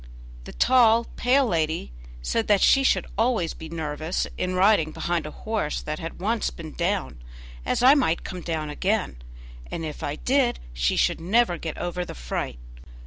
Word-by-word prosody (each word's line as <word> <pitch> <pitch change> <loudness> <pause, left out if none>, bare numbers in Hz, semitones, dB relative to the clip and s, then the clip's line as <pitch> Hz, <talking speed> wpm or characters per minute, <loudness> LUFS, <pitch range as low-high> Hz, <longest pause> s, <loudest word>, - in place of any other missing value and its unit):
The - - -8
tall, 235 -2 +4
pale 265 +2 +3
lady 160 - -1 0.3
said 225 - 0
that 205 -2 +4
she 270 - +6
should 270 - +2
always 225 -8 +1
be 160 - -9
nervous 160 +1 -2
in 185 0 -2
riding 185 -4 +4
behind 170 -2 -2
a 150 - -10
horse 215 -9 -1
that 150 0 -4
had 165 +1 -7
once 220 +4 0
been 160 -2 -9
down, 175 - -2 0.5
as - - 0
I 260 +2 +9
might 250 - +1
come 185 -2 -6
down 155 -3 -3
again, 185 - -1 0.5
and 165 - -4
if 155 - -6
I 145 - -3
did 255 - +1
she - - +1
should - - +1
never 185 -1 +2
get 160 - -5
over 175 0 -3
the - - -8
fright. 60 0 -4
175 Hz, 175 wpm, -25 LUFS, 155-225 Hz, 0.5 s, I